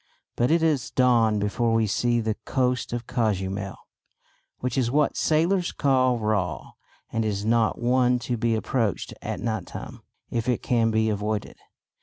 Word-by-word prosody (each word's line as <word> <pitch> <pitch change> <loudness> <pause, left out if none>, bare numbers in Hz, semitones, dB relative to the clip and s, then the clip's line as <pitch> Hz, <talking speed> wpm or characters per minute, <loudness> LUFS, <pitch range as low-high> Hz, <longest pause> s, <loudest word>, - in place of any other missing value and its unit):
But 120 +1 +1
it 165 0 +3
is 140 -8 +1
dawn 120 -4 +3
before 115 +3 0
we 115 -1 +3
see 120 +3 +1
the 110 -1 0
coast 125 -2 0
of 120 0 -3
Cozumel, 100 -5 -2 0.8
which 125 -2 -3
is 125 -3 +1
what 145 +3 +2
sailors 175 +4 +1
call 130 -3 +2
"raw" 105 -5 -1 0.4
and 115 - 0
is 105 -1 -2
not 115 -1 +2
one 125 +1 +3
to 125 - -1
be 115 0 +1
approached 110 -2 -1
at - - -4
night 110 -5 -3
time - - -8 0.3
if 115 +1 -1
it 125 - 0
can 115 -2 +2
be 110 0 +1
avoided. 105 0 -3
115 Hz, 160 wpm, -25 LUFS, 110-125 Hz, 0.8 s, it